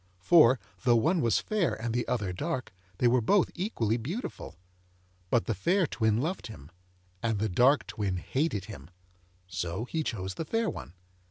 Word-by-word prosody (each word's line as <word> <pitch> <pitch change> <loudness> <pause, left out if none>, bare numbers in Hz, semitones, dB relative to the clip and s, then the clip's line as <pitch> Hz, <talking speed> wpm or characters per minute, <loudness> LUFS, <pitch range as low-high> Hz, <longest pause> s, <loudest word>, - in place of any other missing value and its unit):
For, 130 - +5 0.2
though 120 -2 +5
one 160 +9 +2
was 115 - +3
fair 210 - 0
and 115 0 -3
the 120 0 -1
other 105 -7 -1
dark, 130 - -3 0.2
they 125 - +3
were 125 +1 +4
both 195 - +3
equally 120 - -1
beautiful. 165 - -6 0.7
But 120 - +2
the 115 - 0
fair 175 - +2
twin 110 -7 +1
loved 165 +5 -2
him, 75 -8 -12 0.5
and 115 -2 0
the 110 +2 0
dark 125 +10 +4
twin 100 -4 -2
hated 120 - -1
him, 100 -5 -10 0.6
so 90 +3 -4
he 160 +5 -2
chose 95 -10 -3
the 165 - -5
fair 225 +6 0
one. - - -9
120 Hz, 170 wpm, -29 LUFS, 105-160 Hz, 0.7 s, For